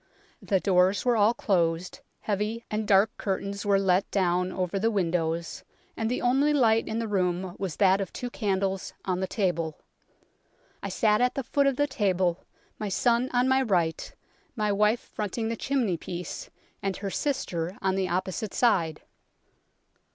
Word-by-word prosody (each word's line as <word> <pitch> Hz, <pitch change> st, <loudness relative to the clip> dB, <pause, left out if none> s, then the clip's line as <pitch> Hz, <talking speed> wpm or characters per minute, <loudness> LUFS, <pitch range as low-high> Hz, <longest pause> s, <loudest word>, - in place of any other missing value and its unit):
The 195 Hz, -3 st, +1 dB
doors 185 Hz, +2 st, +2 dB
were 245 Hz, -1 st, +3 dB
all 220 Hz, +2 st, +4 dB
closed, 170 Hz, -4 st, 0 dB, 0.2 s
heavy 215 Hz, +3 st, -2 dB
and 215 Hz, 0 st, -2 dB
dark 205 Hz, +4 st, +4 dB
curtains 200 Hz, +1 st, -3 dB
were 200 Hz, -1 st, +4 dB
let 190 Hz, -1 st, +2 dB
down 180 Hz, -1 st, +1 dB
over 185 Hz, +1 st, -2 dB
the 225 Hz, +3 st, +2 dB
windows, 170 Hz, -4 st, -1 dB, 0.3 s
and 225 Hz, 0 st, -1 dB
the 250 Hz, -, -2 dB
only 270 Hz, +5 st, +3 dB
light 225 Hz, -5 st, +3 dB
in 220 Hz, -, -2 dB
the 230 Hz, -1 st, -2 dB
room 185 Hz, -2 st, -1 dB
was 185 Hz, -5 st, -3 dB
that 195 Hz, 0 st, +4 dB
of 195 Hz, -, -4 dB
two 245 Hz, -1 st, -5 dB
candles 195 Hz, -3 st, -1 dB
on 185 Hz, -1 st, -1 dB
the 190 Hz, -, -1 dB
table. 170 Hz, -6 st, -1 dB, 1.0 s
I -, -, -4 dB
sat 215 Hz, -1 st, +2 dB
at 250 Hz, 0 st, +2 dB
the 275 Hz, -, -2 dB
foot 280 Hz, +3 st, +1 dB
of 275 Hz, -, +2 dB
the 290 Hz, -, +2 dB
table, 190 Hz, -9 st, 0 dB, 0.4 s
my 210 Hz, -, -3 dB
son 235 Hz, +5 st, +2 dB
on 245 Hz, +1 st, +2 dB
my 265 Hz, 0 st, +3 dB
right, 175 Hz, -9 st, 0 dB, 0.4 s
my 210 Hz, -3 st, 0 dB
wife 210 Hz, +3 st, +2 dB
fronting 220 Hz, +2 st, -4 dB
the 230 Hz, -, -1 dB
chimney 235 Hz, -8 st, 0 dB
piece, 175 Hz, 0 st, -6 dB, 0.3 s
and 195 Hz, -2 st, -2 dB
her 200 Hz, -1 st, -4 dB
sister 185 Hz, -, -2 dB
on 190 Hz, -1 st, 0 dB
the 190 Hz, -1 st, -1 dB
opposite 185 Hz, +3 st, -2 dB
side. 170 Hz, -10 st, +2 dB
200 Hz, 165 wpm, -27 LUFS, 180-225 Hz, 1.0 s, all